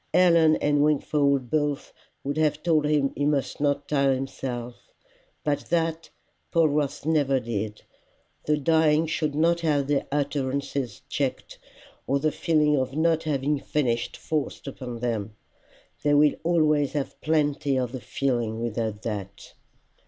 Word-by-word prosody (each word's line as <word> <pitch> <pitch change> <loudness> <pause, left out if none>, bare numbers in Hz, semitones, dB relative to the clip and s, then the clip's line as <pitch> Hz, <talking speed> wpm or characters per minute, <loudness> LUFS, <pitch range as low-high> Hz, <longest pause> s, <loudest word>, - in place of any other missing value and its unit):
Helen 170 -3 +5
and 145 -1 +2
Wingfold 140 -3 +1
both 145 -2 -1 0.3
would 140 +1 -2
have 150 -1 +1
told 155 -3 +2
him 145 -2 +1
he 145 - -2
must 145 -1 0
not 145 -1 0
tire 140 -2 +2
himself, 125 -2 -6 0.5
but 145 -1 -1
that 165 -1 0 0.4
Polwarth 150 -4 +1
never 145 -4 +2
did. 110 -3 -4 0.6
The 150 0 +2
dying 160 +1 +3
should 155 -2 -1
not 170 +2 +3
have 150 -4 +1
their 140 0 0
utterances 140 -2 -2
checked, - - -3 0.5
or 140 - +2
the 155 +2 +1
feeling 150 -2 +2
of 130 0 -2
not 160 0 +2
having 145 -1 0
finished 120 -7 -1
forced 155 -3 -3
upon 125 -4 -7
them. 110 -3 -2 0.7
They 145 0 +3
will 145 0 +5
always 155 -4 +2
have 145 -3 -4
plenty 145 -3 +1
of 125 -2 -1
the 130 -1 -6
feeling 115 -1 -1
without 110 -2 -3
that. 100 -3 -6
145 Hz, 140 wpm, -26 LUFS, 130-155 Hz, 0.7 s, Helen